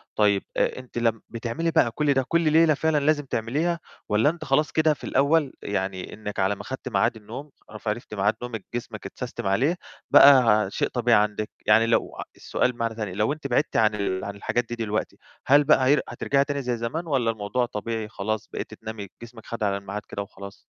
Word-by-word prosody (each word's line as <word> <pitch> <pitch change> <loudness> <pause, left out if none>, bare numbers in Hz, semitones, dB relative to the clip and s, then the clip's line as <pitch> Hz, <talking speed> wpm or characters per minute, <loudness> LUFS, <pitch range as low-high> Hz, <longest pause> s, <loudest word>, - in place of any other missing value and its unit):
طيب 100 -2 +3
آآ - - +1
أنتِ 125 -1 -11
لم 115 -2 +1
بتعملي 120 +8 -2
بقى 120 - +3
كُلّ 145 +2 +1
ده 135 -1 +2
كُلّ 170 0 +2
ليلة 160 -1 +5
فعلًا 160 +1 +1
لازم 145 0 +2
تعمليها 150 +10 -1 0.3
والَّا 105 +8 +4
أنتِ 170 +1 -5
خلاص 150 +3 +2
كده 155 -1 +3
في - - -15
الأول، 140 +1 +2
يعني 95 -2 -3
إنِّك 105 -2 -6
على 95 +2 +2
ما 100 - -9
خدتِ 130 +3 -6
ميعاد 115 0 +1
النوم 120 +7 -9 0.2
عرفتِ 110 +1 -5
ميعاد 105 +2 +1
نومِك 115 -4 -6
جسمِك 120 - -6
اتسستم - - -5
عليه، 135 - +2 0.4
بقى 115 -8 +7
شيء - - 0
طبيعي 120 -3 +3
عندِك، 105 0 -2 0.2
يعني 110 +2 +5
لو 115 - +1 0.2
السؤال 125 - 0
بمعنى 115 -2 -3
تاني، 105 -5 -4
لو 105 +8 +1
أنتِ 155 -2 -6
بِعدتِ 135 +4 +1
عن 110 -1 +3
ال 95 -2 -2
عن 100 0 -5
الحاجات 120 +4 -1
دي 120 - -3
دلوقتي 110 -2 -3 0.3
هل 145 +2 +6
بقى 140 -3 +4
هي 145 +2 +4
هترجعي 140 0 +1
تاني 140 -1 -3
زي 125 -2 -2
زمان 155 +9 -4
والَّا 125 -6 +1
الموضوع 110 +3 -1
طبيعي 110 -1 -4
خلاص، 110 0 -3
بقيتِ - - -5
تنامي 110 -2 -7
جسمِك 120 -1 -12
خَد 115 -2 -5
على 100 -1 +1
الميعاد 100 +1 -6
كده 100 - -5
وخلاص؟ 100 0 -10
115 Hz, 200 wpm, -25 LUFS, 105-140 Hz, 0.4 s, بقى